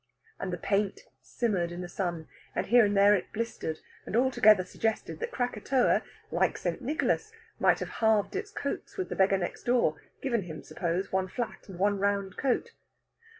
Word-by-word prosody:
And 185 - -3
the 175 - -2
paint 200 +2 0 0.2
simmered 190 -8 -1
in 175 +1 -5
the 180 - -5
sun, 175 -3 -3 0.3
and - - 0
here 240 -1 +6
and 205 0 +1
there 200 +1 +7
it 190 -4 -1
blistered 220 -8 -3 0.3
and - - -3
altogether 220 -6 +5
suggested 185 -6 -2
that - - -3
Krakatoa, 245 +1 +1 0.3
like - - +2
St. - - -3
Nicholas, 285 - 0 0.3
might - - +4
have - - -3
halved 220 -2 +3
its 410 +1 -3
coats - - -5
with 375 - -2
the - - -3
beggar 195 0 +4
next 175 -2 -4
door 240 -11 +2 0.2
given 240 -5 0
him, 160 -4 -8
suppose, 180 +2 -2
one 190 0 +1
flat 230 +2 -5
and 185 - -8
one 200 +1 +2
round 200 -1 0
coat. 275 - 0
205 Hz, 180 wpm, -29 LUFS, 185-240 Hz, 0.3 s, there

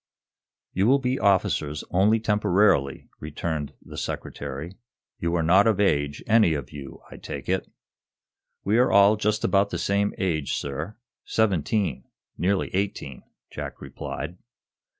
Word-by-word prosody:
"You 95 +4 +2
will 135 +3 +6
be 130 -1 -1
officers 75 -7 +1
only 105 +5 +4
temporarily," 105 -10 +2
returned 75 0 -4
the - - -11
Secretary. 70 +5 -5 0.5
"You 85 0 -1
are 85 - +1
not 95 +6 +5
of 110 -3 +2
age, 75 -7 +1
any 110 -7 +4
of 70 -4 -6
you, 70 -2 -10
I - - -9
take - - -7
it." - - -1 0.9
"We 105 +4 +2
are 125 - +4
all 100 +1 +6
just 105 0 0
about 100 0 +3
the 90 - -3
same 100 +4 0
age, 80 -7 -1
sir 75 +10 -5 0.3
seventeen, 95 - 0 0.3
nearly 95 +3 0
eighteen," 95 -9 -3 0.3
Jack - - -6
replied. 85 +6 -6
95 Hz, 135 wpm, -25 LUFS, 75-105 Hz, 0.9 s, will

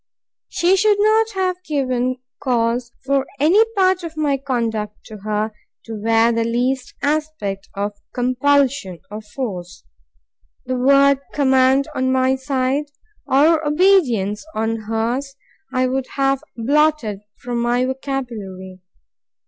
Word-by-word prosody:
She 355 +2 +2
should 420 +1 +3
not 435 +1 +3
have 365 -1 -1
given 255 -5 -1 0.2
cause 240 -1 0
for 275 0 +1
any 345 +10 +5
part 375 -1 +3
of 325 -2 -7
my 295 -2 +1
conduct 230 -6 -2
to 215 - -10
her 210 +1 -2 0.3
to 225 - -7
wear 225 +2 +2
the 230 0 +1
least 250 +2 -1
aspect 290 -10 -2
of 205 +1 -2 0.2
compulsion 255 -5 +1
or 210 +1 -6
force. 205 -6 -6 0.8
The 255 - -2
word 275 +2 +4 0.2
command, 265 0 +3
on 260 0 0
my 260 0 +2
side, 265 +1 -1 0.4
or 310 +4 +4
obedience 295 - +2
on 225 +1 0
hers, 230 +5 -2 0.4
I 255 -1 +1
would 260 0 -1
have 275 -1 +1 0.2
blotted 275 -4 +1 0.2
from 240 -1 -3
my 240 +1 +1
vocabulary. 230 -9 -5
260 Hz, 125 wpm, -20 LUFS, 225-285 Hz, 0.8 s, any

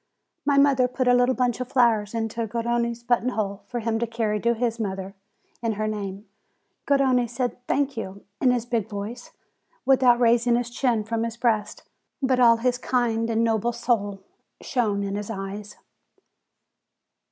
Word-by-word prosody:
My 285 -1 +3
mother 275 -3 +4
put 255 0 -2
a 245 - +6
little 245 +1 +3
bunch 245 -2 0
of 255 - -3
flowers 230 -4 +2
into 225 0 -2
Gar 230 +2 -3
rone's 235 0 -1
button 240 0 +1
hole, 200 -4 -3
for 240 -1 -4
him 225 0 -1
to 235 - -1
carry 220 -2 -1
to 235 +2 +1
his 235 0 -1
mother 195 -2 -4 0.5
in 230 -2 0
her 215 +1 -2
name. 200 -1 -5 0.6
Garrone 265 -3 +3
said, 245 +1 -3
"Thank 280 0 0
you," 200 -2 -6 0.2
in 260 - +4
his 245 -2 +1
big 230 -4 -1
voice, 210 +4 -6 0.6
without 255 -3 +5
raising 235 0 +4
his 240 0 -2
chin 240 -3 +1
from 225 +1 -2
his 230 0 -3
breast. 220 -4 0 0.4
But 260 -2 +1
all 230 -2 +6
his 245 +1 0
kind 230 -3 0
and 225 0 +1
noble 230 +1 +1
soul 205 -5 -1 0.4
shone 210 -5 -1
in 195 0 -3
his 205 +1 -4
eyes. 205 0 -6
235 Hz, 170 wpm, -25 LUFS, 215-245 Hz, 0.6 s, a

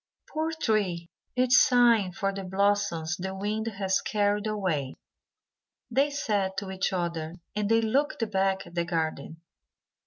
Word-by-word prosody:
"Poor 315 +1 -1
tree! 185 - 0 0.2
it 255 0 +2
is 245 - +7
sighing 235 -7 +4
for 195 +1 -2
the 195 0 -5
blossoms 190 -3 0
the 190 +1 -4
wind 210 +3 -2
has 195 -3 0
carried 205 0 0
away," 180 -11 -1 1.0
they 275 +4 +3
said 205 -9 -1
to 195 -2 -3
each 190 0 -1
other, 170 -3 -3 0.2
and 210 -1 -1
they 225 0 +4
looked 240 +1 0
back 195 0 +1
at - - -14
the 170 -1 0
garden. 160 -2 -3
195 Hz, 150 wpm, -27 LUFS, 180-220 Hz, 1.0 s, is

